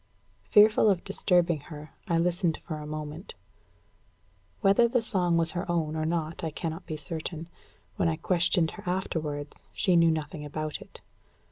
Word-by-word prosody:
Fearful 215 Hz, +1 st, +6 dB
of 190 Hz, -3 st, +1 dB
disturbing 175 Hz, -4 st, +2 dB
her, 150 Hz, -1 st, -9 dB, 0.2 s
I 170 Hz, -, +2 dB
listened 170 Hz, -1 st, +1 dB
for 155 Hz, -, -6 dB
a 150 Hz, 0 st, -7 dB
moment. 155 Hz, -, -6 dB, 1.3 s
Whether 200 Hz, +5 st, +5 dB
the 240 Hz, -1 st, +1 dB
song 180 Hz, -6 st, +1 dB
was 165 Hz, -1 st, +1 dB
her 180 Hz, +1 st, -4 dB
own 160 Hz, -2 st, 0 dB
or 155 Hz, 0 st, -1 dB
not, 165 Hz, -1 st, -2 dB
I 160 Hz, -, 0 dB
cannot 165 Hz, +3 st, -5 dB
be 155 Hz, -, -4 dB
certain. 160 Hz, +2 st, -5 dB, 0.5 s
When -, -, +2 dB
I 160 Hz, -, 0 dB
questioned 170 Hz, 0 st, +2 dB
her -, -, -11 dB
afterwards, 155 Hz, -5 st, -3 dB
she 185 Hz, -, +2 dB
knew 165 Hz, -1 st, +6 dB
nothing 155 Hz, 0 st, -3 dB
about 155 Hz, +1 st, -4 dB
it. -, -, -13 dB
165 Hz, 160 wpm, -28 LUFS, 155-180 Hz, 1.3 s, Fearful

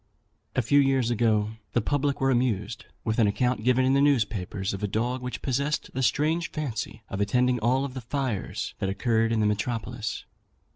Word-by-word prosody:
A 130 Hz, -, +2 dB
few 145 Hz, +6 st, +4 dB
years 135 Hz, -3 st, +2 dB
ago, 110 Hz, -2 st, +2 dB, 0.2 s
the -, -, +3 dB
public 145 Hz, +4 st, 0 dB
were 135 Hz, 0 st, +2 dB
amused 115 Hz, -3 st, 0 dB, 0.2 s
with 110 Hz, +1 st, -1 dB
an 110 Hz, -, +5 dB
account 125 Hz, +2 st, 0 dB
given 125 Hz, +1 st, +3 dB
in 130 Hz, -, +3 dB
the 140 Hz, -, +4 dB
newspapers 105 Hz, -8 st, +1 dB
of 100 Hz, -, -5 dB
a 105 Hz, -, 0 dB
dog 120 Hz, +5 st, -1 dB
which 125 Hz, 0 st, -5 dB
possessed 140 Hz, +3 st, -1 dB
the 130 Hz, -, -2 dB
strange 155 Hz, +8 st, +1 dB
fancy 115 Hz, -6 st, -4 dB
of 95 Hz, -, -4 dB
attending 125 Hz, +4 st, +2 dB
all 130 Hz, +5 st, +2 dB
the 130 Hz, -1 st, -7 dB
fires 120 Hz, -3 st, -3 dB
that 95 Hz, -, -1 dB
occurred 115 Hz, +3 st, +1 dB
in 110 Hz, -1 st, +2 dB
the -, -, +3 dB
metropolis. 110 Hz, +1 st, -2 dB
120 Hz, 185 wpm, -27 LUFS, 110-130 Hz, 0.2 s, an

